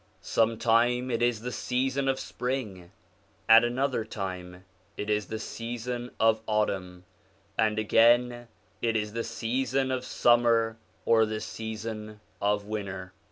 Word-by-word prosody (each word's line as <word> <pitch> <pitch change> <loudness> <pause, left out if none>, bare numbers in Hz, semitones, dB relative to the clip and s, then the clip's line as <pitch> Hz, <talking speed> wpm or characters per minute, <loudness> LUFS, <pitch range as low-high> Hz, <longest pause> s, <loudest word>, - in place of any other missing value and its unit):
Sometime 115 +2 +2
it 115 - -1
is 120 -2 +1
the 125 +1 -4
season 130 +2 -1
of 135 0 +1
spring, 110 -9 -4 0.6
at 115 +1 +8
another 125 0 0
time 95 -4 -6 0.3
it 105 +1 -2
is 105 -3 0
the 110 - -4
season 120 +2 -5
of 110 0 +3
autumn, 95 -4 -1 0.5
and 110 -1 +1
again 120 +2 +3 0.3
it 115 -1 +1
is 105 -1 -1
the 115 0 -2
season 130 +4 -1
of 130 -1 -1
summer 115 -2 +3 0.3
or 110 -1 +4
the 110 0 -3
season 110 -1 -6 0.2
of 105 0 +1
winter. 95 -3 -5
115 Hz, 130 wpm, -28 LUFS, 105-120 Hz, 0.6 s, at